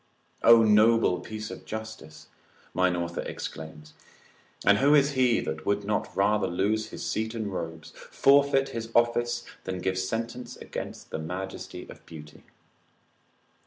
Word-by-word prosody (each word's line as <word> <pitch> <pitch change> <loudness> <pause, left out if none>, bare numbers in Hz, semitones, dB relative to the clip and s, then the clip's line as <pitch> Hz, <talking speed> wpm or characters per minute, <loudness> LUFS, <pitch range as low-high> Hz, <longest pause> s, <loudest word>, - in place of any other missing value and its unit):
O 115 -1 +7
noble 110 -3 +4
piece 110 0 -7
of - - -9
justice! 110 -8 -8 0.5
mine 90 -1 +2
author 85 0 -3
exclaims: 80 -1 -8 0.7
and 100 +1 +5
who 145 +2 +5
is 140 0 +4
he 125 -4 +3
that 80 0 -4
would 100 +3 0
not 105 0 -2
rather 105 +2 +2
lose 105 +5 0
his - - -7
seat 110 +1 -2
and 105 -4 -3
robes, 80 -3 -6 0.2
forfeit 140 -1 +4
his 115 -1 -5
office, 120 0 +2 0.2
than 95 0 -3
give 95 +1 -1
sentence 115 +5 -4
against - - -7
the - - -3
majesty 90 +4 -6
of - - -13
beauty? 75 -2 -12
105 Hz, 140 wpm, -27 LUFS, 90-115 Hz, 0.7 s, O